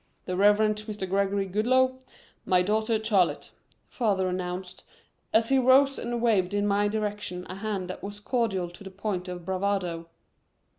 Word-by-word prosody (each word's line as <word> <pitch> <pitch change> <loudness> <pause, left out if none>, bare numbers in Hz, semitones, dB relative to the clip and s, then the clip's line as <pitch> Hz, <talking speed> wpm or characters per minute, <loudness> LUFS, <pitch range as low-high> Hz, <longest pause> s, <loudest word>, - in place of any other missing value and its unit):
"The 185 - -3
Reverend 210 +2 +4
Mr. 210 -2 -5
Gregory 195 +1 0
Goodloe 255 +7 +2 0.4
my 180 -1 +3
daughter 220 +3 +1
Charlotte," 200 -5 +1 0.4
father 200 -6 0
announced, 180 0 -4 0.5
as 225 +1 +3
he 270 0 +4
rose 270 +2 +4
and 240 0 -3
waved 205 -4 +2
in 205 0 +1
my 205 0 +2
direction 205 -4 -3
a 185 - -7
hand 200 -3 -3
that - - -9
was 205 +1 -7
cordial 205 -6 -1
to 175 - -13
the 195 - -8
point 190 -1 -4
of 180 -2 -7
bravado. 185 -3 -2
200 Hz, 155 wpm, -27 LUFS, 185-220 Hz, 0.5 s, Reverend